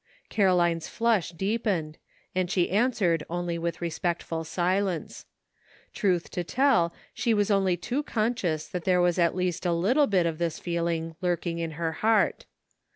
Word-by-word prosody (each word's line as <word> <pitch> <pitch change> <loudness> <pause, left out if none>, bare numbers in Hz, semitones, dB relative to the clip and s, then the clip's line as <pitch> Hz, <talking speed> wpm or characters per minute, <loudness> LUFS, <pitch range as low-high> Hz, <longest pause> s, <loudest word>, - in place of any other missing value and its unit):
Caroline's 175 -5 +2
flush 230 -7 +1
deepened, 190 -4 -2 0.3
and 185 -1 0
she 180 -2 +1
answered 200 -7 +2
only 175 0 -2
with 170 +1 -3
respectful 170 -1 -2
silence. 180 +1 -1 0.7
Truth 180 -5 0
to 180 - -2
tell, 240 -5 +2 0.2
she 230 -2 +1
was 205 0 +1
only 190 -3 +2
too 245 - -2
conscious 215 - -1
that 180 -2 -5
there 180 -1 +3
was 175 0 +2
at 170 0 +3
least 180 -2 -1
a 175 - +1
little 245 - +3
bit 185 -4 +2
of 165 -1 -2
this 170 -2 -1
feeUno 170 -1 -2
lurking 175 -1 -1
in 165 -1 -3
her 165 -1 -1
heart. 220 +6 +1
175 Hz, 155 wpm, -27 LUFS, 170-200 Hz, 0.7 s, there